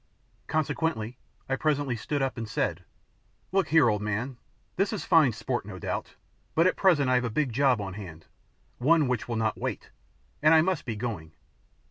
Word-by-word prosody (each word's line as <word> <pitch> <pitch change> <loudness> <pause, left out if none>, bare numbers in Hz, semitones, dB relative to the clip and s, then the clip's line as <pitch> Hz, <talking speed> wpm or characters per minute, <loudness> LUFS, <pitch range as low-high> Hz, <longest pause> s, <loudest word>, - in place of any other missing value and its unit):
Consequently 155 -6 -1 0.3
I 135 - 0
presently 145 -3 0
stood 140 +5 -2
up 135 - -1
and 115 -3 -5
said - - -1 0.7
"Look 195 0 +2
here, 155 -3 +5
old 105 -2 +1
man, 110 +5 -3 0.4
this 195 +2 +1
is 210 - -4
fine 160 -7 +5
sport 110 - -3
no - - -8
doubt, - - -4 0.4
but 165 - +5
just 185 - +4
at - - -19
present 165 -8 +4
I 130 - +3
have 125 0 +3
a 120 - -1
big 130 +1 -1
job 130 -1 +3
on 100 -2 -4
hand 90 -6 -9 0.5
one 150 +3 +4
which 125 -3 -1
will 120 - -2
not 110 -1 -1
wait, - - -4 0.5
and 155 +2 +6
I 160 - +6
must 185 -2 -1
be 115 - -3
going. 105 -9 -5
130 Hz, 190 wpm, -27 LUFS, 110-155 Hz, 0.7 s, and